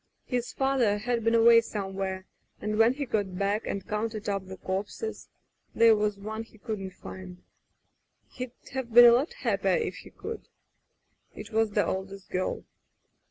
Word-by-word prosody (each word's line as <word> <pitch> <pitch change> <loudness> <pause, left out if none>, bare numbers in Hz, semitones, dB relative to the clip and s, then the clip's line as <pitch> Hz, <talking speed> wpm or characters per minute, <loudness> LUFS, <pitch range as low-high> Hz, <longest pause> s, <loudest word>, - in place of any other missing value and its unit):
His 245 -2 -2
father 265 -6 +2
had 235 +2 -1
been 230 +1 +3
away 230 0 +7
somewhere, 195 -3 -4 0.3
and 215 +1 -2
when 230 +3 +5
he 285 0 -3
got 200 -6 -2
back 200 +2 0
and 195 -1 -4
counted 215 0 -3
up 195 -2 -2
the 190 0 -8
corpses 200 - -4 0.2
— - - -24
^there 230 -1 +7
was 210 -1 0
one 215 +2 -5
he 225 -1 -13
couldn't 205 -4 -5
find. 185 -1 -10 0.9
He'd 250 -1 -6 0.2
have 265 -3 -4
been 240 +2 +10
a 240 - +10
lot 270 - +2
happier - - +1
if 465 - -3
he - - -11
could. 455 - -8 0.9
It 210 +1 -9
was 220 -1 +1
the 205 - +2
oldest 190 0 -5
girl 185 0 -2
215 Hz, 165 wpm, -28 LUFS, 195-235 Hz, 0.9 s, been